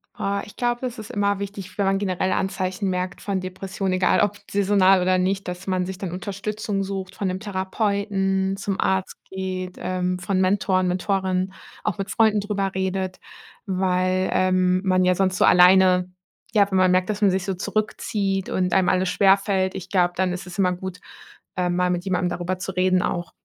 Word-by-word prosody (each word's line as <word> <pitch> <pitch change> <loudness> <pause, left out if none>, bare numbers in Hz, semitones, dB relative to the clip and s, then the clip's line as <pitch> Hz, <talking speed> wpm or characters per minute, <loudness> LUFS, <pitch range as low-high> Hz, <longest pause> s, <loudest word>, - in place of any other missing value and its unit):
Ah, 200 0 -1
ich 210 - -14
glaube, 240 0 -1
das 250 -2 -4
ist 215 -2 -8
immer 200 -1 +1
wichtig, 200 -1 -7
wenn 200 - +1
man 195 0 +2
generell 190 -1 -1
Anzeichen 190 +1 -1
merkt 180 0 -3
von 195 -2 -2
Depression, 185 +1 -4
egal 185 0 +3
ob 205 0 +1
saisonal, 195 -1 +4
oder 185 +1 +2
nicht, 190 +1 -1
dass 180 +2 -6
man 185 -1 0
sich 190 0 -6
dann 185 -4 -4
Unterstützung 200 +2 -3
sucht 190 -1 -5
von 195 - -2
'nem 185 +1 -2
Therapeuten, 195 -1 -1
zum 195 -1 -3
Arzt 190 0 0
geht, 185 -1 -5
ähm, 180 0 -1
von 185 +1 -1
Mentoren, 185 -1 +2
Mentorinnen, 185 0 -1 0.3
auch 210 -5 -1
mit 195 +1 -3
Freunden 220 -2 +3
darüber 200 -2 -2
redet, 190 0 -2 0.5
weil, 185 0 +1
ähm, 185 0 +2
man 185 -1 +2
ja 180 - +4
sonst 185 0 0
so - - +4
alleine 180 0 +5 0.4
ja, 205 -3 +5
wenn 190 - +2
man 185 -1 +4
merkt, 185 +2 +2
dass 210 0 -2
man 205 - +5
sich 190 0 0
so 190 -1 -2
zurückzieht 200 -1 -2
und 185 -1 0
einem 190 -1 +3
alles 185 0 +2
schwerfällt, 195 -1 +2
ich 190 0 -7
glaube, 175 -2 +2
dann 185 -1 +1
ist 180 0 -6
es 175 - -9
immer 185 -2 +3
gut, 180 0 -6 0.6
ähm, 180 -1 0
mal 180 0 +1
mit 175 +1 -2
jemandem 180 -1 0
darüber 180 +1 -3
zu 185 +1 -5
reden 185 0 +2
auch. 175 -1 -3
190 Hz, 190 wpm, -23 LUFS, 185-195 Hz, 0.6 s, alleine